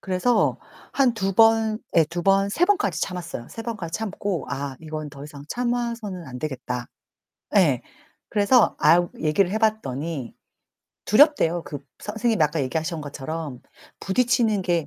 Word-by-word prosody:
그래서 190 +6 +1 0.3
한 265 -3 +3
2 195 -3 -1
번 225 0 +4 0.2
예 165 - +7
2 170 +3 -5
번, 195 +1 +3
3 335 +12 +3
번까지 410 +1 +1
참았어요. 170 -9 -5
3 225 - -7
번까지 200 -8 -5
참고 200 -6 -3
'아 140 -1 -4
이건 155 -1 -6
더 140 0 -10
이상 145 -1 -10
참아서는 235 -7 -2
안 125 - -7
되겠다.' 125 -3 -4 0.7
예. 145 -11 +4 0.5
그래서 215 +3 +3
아우 170 +3 +4
얘기를 170 +4 +2
해 215 - 0
봤더니 160 - -2 0.7
두렵대요. 215 - +4
그 145 - -6 0.2
선생님이 220 -3 0
아까 150 0 +1
얘기하신 160 +5 -2
것처럼 145 -1 -6 0.4
부딪히는 220 0 +2
게 170 -4 0
180 Hz, 280 characters per minute, -24 LUFS, 150-220 Hz, 0.7 s, 예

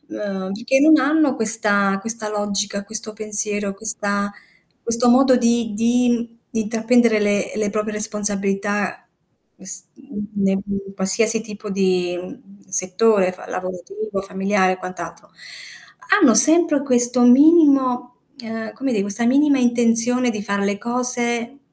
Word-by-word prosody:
Ehm, 195 -2 -5
perché 240 +6 0
non 310 +1 +6
hanno 290 0 +2
questa 210 -3 +2
questa 225 0 -4
logica, 205 -1 -3
questo 215 0 -5
pensiero, 210 -1 -2
questa 205 -1 -3 0.5
questo 235 +1 0
modo 260 +1 +5
di 235 -2 0
di 235 0 0
di 225 - -2
intraprendere 225 +1 +2
le 205 -1 0
le 215 -1 -2
proprie 215 0 -3
responsabilità, 205 -1 -2 0.5
es - - -6
mhmm, 270 -7 -9 0.2
ne 195 - +2 0.2
in 195 -1 -6
qualsiasi 215 +4 +1
tipo 210 -1 -9
di, 185 -2 0
mhmm, 195 +2 -13
settore 185 +1 +1
fa 185 - -13
lavorativo, 195 +3 -6
familiare 195 0 0
e 185 - -4
quant'altro. 185 0 -9 0.9
Hanno 265 -8 +5
sempre 305 +3 +4
questo 245 -2 +2
minimo, 260 -2 +4 0.2
ehm, 225 -2 -7
come 270 -1 -3
di 210 - 0
questa 205 +4 -2
minima 280 +3 +3
intenzione 245 0 +3
di 215 -2 -5
fare 200 0 -2
le 200 0 -1
cose, 240 +1 -2
220 Hz, 135 wpm, -20 LUFS, 200-245 Hz, 0.9 s, non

